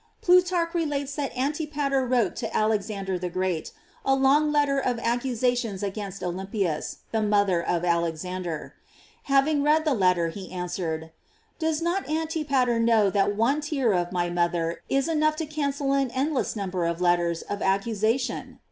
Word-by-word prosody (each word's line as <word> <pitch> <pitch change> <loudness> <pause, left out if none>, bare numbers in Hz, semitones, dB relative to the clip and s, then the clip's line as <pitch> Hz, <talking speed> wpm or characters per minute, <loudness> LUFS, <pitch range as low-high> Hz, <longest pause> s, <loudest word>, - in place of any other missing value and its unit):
Plutarch 360 -1 +3
re 340 -1 +1
lates 285 -2 -2
that 280 -2 -3
Antipater 285 -1 0
wrote 240 -6 +1
to - - -2
Alexander 205 -3 -1
the 180 0 -3
Great 185 -2 -2 0.3
a 270 - +3
long 280 +3 +3
letter 290 -2 +2
of 250 -3 0
accusations 240 -3 -1
against 200 -1 -5
Olympias, 185 -2 -3
the 220 - +1
mother 205 -4 +2
of 170 0 -1
Alexander. 170 0 -2 0.5
Having 280 +2 +3
read 305 +2 +3
the 300 - +3
letter, 180 -6 +2
he 185 +2 -8
answered: 175 -3 -4 0.5
"Does 320 -1 0
not 345 0 -1
Anti 320 0 -1
pater 250 -4 +2
know 225 -3 +4
that 205 0 +1
one 255 +8 +2
tear 275 -7 +1
of 175 -1 0
my 175 -1 0
mother 170 -1 0
is 275 +2 +1
enough 310 -1 +2
to 320 0 -3
cancel 280 -2 -1
an 275 -2 +1
endless 275 -1 0
number 185 -4 -2
of 170 0 -2
letters 175 -1 +1
of 205 - -5
ac 195 +4 +1
cusation 225 +5 -1
230 Hz, 160 wpm, -26 LUFS, 185-285 Hz, 0.5 s, know